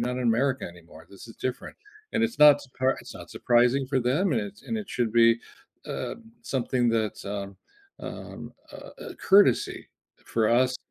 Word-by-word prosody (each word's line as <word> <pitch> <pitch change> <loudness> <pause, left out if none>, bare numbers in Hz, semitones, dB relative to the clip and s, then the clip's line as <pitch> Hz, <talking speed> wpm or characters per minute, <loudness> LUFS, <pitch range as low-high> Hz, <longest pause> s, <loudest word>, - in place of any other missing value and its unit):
not 125 +1 -2
in - - -2
America 130 +4 +1
anymore, 85 -2 -14
this 100 +2 -12
is 115 - -12
different," 130 -1 -5 0.4
and 230 - +1
it's 230 - -4
not 150 -1 +8
surpri 130 -1 -1
it's - - -11
not - - -11
surprising 125 +3 +2
for 135 0 0
them, 140 +10 +1
and 115 - +1
it's 105 0 -9
and 225 - -3
it 210 -3 -7
should 115 -3 -1
be, 115 0 +5 0.5
uh, - - -4 0.3
something 125 - 0
that's, 110 -2 -1
um 100 -1 -5 0.4
um, - - -8 0.2
uh, - - -10 0.2
a - - -9
courtesy 200 +1 +3 0.4
for 110 -2 0
us 125 +2 +3
125 Hz, 175 wpm, -26 LUFS, 110-135 Hz, 0.5 s, not